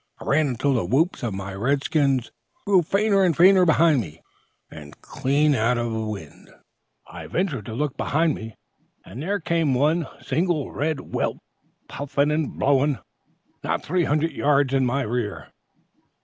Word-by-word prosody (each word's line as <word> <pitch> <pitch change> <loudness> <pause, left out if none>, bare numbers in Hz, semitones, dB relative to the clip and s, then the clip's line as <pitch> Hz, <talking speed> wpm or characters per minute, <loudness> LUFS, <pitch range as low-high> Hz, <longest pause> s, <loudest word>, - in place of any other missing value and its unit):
I - - -11
run 150 +2 +2
until 135 +2 0
the 120 - 0
whoops 140 - +1
of 115 -5 -3
my 95 0 -6
red 135 +8 0
skins 135 -7 +1 0.3
grew 195 -3 +4
fainter 200 +3 +2
and 175 -5 +2
fainter 185 0 +6
behind 160 -4 +4
me, 80 -5 -11 0.5
and, 75 -2 -12
clean 145 +3 +1
out 120 0 +1
of 120 -1 -2
wind, 105 -8 -6 0.6
I - - -10
ventured 155 - -2
to 110 - -6
look 145 +1 -2
behind 160 +2 +1
me, 110 -1 -8 0.5
and 125 - -9
there 200 +6 -1
came 165 -4 0
one 150 +4 +1
single 165 -5 -1
red 150 +1 -2
whelp, - - -1 0.5
puffing 145 +1 -1
and 155 -1 -2
blowing, 140 0 +2 0.7
not - - -2
three 175 +1 0
hundred 155 +3 0
yards 140 -2 +1
in 135 -2 +2
my 135 +3 0
rear. 110 -3 -4
140 Hz, 160 wpm, -23 LUFS, 120-160 Hz, 0.7 s, fainter